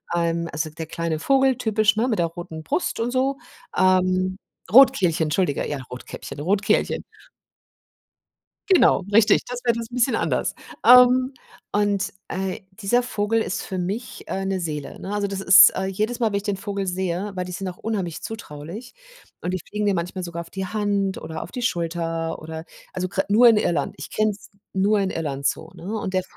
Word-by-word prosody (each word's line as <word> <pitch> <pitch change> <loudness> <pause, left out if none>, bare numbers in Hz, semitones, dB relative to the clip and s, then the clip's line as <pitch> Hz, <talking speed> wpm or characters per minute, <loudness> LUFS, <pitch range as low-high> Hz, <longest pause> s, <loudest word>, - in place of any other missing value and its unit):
Ähm, 170 0 0
also 155 +2 -2
der 160 0 -7
kleine 165 -1 -2
Vogel, 265 - +3
typisch, 215 -2 +2
ne? 230 +4 +1
Mit 220 - 0
der 170 - +3
roten 165 -1 -8
Brust 180 +7 -1
und 235 +2 -1
so. 265 +2 +1 0.4
Ähm, 185 0 +3 0.4
Rotkehlchen, 195 -11 +6
entschuldige, 155 -1 0
ja, 145 - -2
Rotkäppchen, 125 +2 -8
Rotkehlchen. 195 +6 +1 1.7
Genau, 370 - +5
richtig, 215 0 +5
das 245 0 -5
wär 235 -1 +3
das 230 -1 -5
'n - - -10
bisschen 250 -1 +2
anders. - - 0 0.3
Ähm, 250 +2 +7 0.4
und, 205 -1 +1 0.2
äh, 190 0 -3 0.2
dieser 240 +5 +2
Vogel 225 -2 0
ist 195 - -3
für 190 - -5
mich, 205 +6 -4
äh, 195 - -3
'ne 190 0 -1
Seele, 150 -5 -5
ne? 195 - -6
Also 205 -1 0
das 195 -1 -4
ist 195 +1 +9
äh, 190 - -1
jedes 215 +5 -2
Mal, 230 - +2
wenn 205 - -2
ich 200 - -2
den 205 -2 -1
Vogel 200 -1 -4
sehe 185 +2 -2
weil 180 - -2
die 180 - -7
sind 190 +1 -4
auch 180 - -7
unheimlich 195 -7 -3
zutraulich 200 - -8 0.5
und 180 - -2
die 185 - -1
fliegen 210 0 -2
dir 200 - +2
manchmal 180 +1 -3
sogar 170 -1 -5
auf 170 - -8
die 190 -1 -4
Hand 200 -1 -1
oder 160 0 -6
auf - - -9
die 250 - -4
Schulter 165 -4 -2
oder 160 0 -7 0.3
also 185 0 -2
gra 195 +1 0
nur 230 +4 +7
in 225 - +5
Irland, 165 -8 0
ich 145 - -7
kenne 215 0 +1
es 200 -1 -10 0.2
nur 205 +2 +2
in 195 -1 0
Irland 140 -5 -3
so, 160 - -2
ne? 175 - -12
Und 190 -2 -4
der 185 - +2
190 Hz, 195 wpm, -23 LUFS, 170-215 Hz, 1.7 s, ist